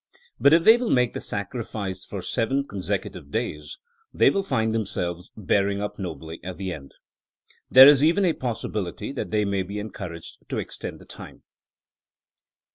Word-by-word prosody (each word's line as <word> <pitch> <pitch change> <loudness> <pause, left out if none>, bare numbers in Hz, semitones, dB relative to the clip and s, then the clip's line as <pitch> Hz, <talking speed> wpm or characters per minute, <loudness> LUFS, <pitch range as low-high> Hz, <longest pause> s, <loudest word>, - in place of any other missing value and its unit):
But 140 - +5
if 165 +1 +5
they 225 +4 +8
will 245 -2 -2
make 125 -2 +2
the - - -5
sacrifice 100 -2 -5
for 100 -3 -7
seven 135 +6 -1
consecutive 90 -7 -4
days 75 +1 -4 0.3
they - - +4
will 195 - 0
find 110 -12 0
themselves 90 -5 -3
bearing 100 -1 +1
up 105 +1 -5
nobly 80 -3 -6
at 90 -1 -6
the 95 -2 -4
end. 70 -4 -11 0.7
There 130 +1 +10
is 145 -1 +6
even 175 +5 +4
a 170 - +3
possibility 110 - -4
that 140 - -4
they 105 -1 +1
may 100 -1 0
be 100 +3 -6
encouraged 95 -5 -7
to - - -3
extend - - -6
the - - -14
time. - - -12
105 Hz, 165 wpm, -25 LUFS, 95-130 Hz, 0.7 s, There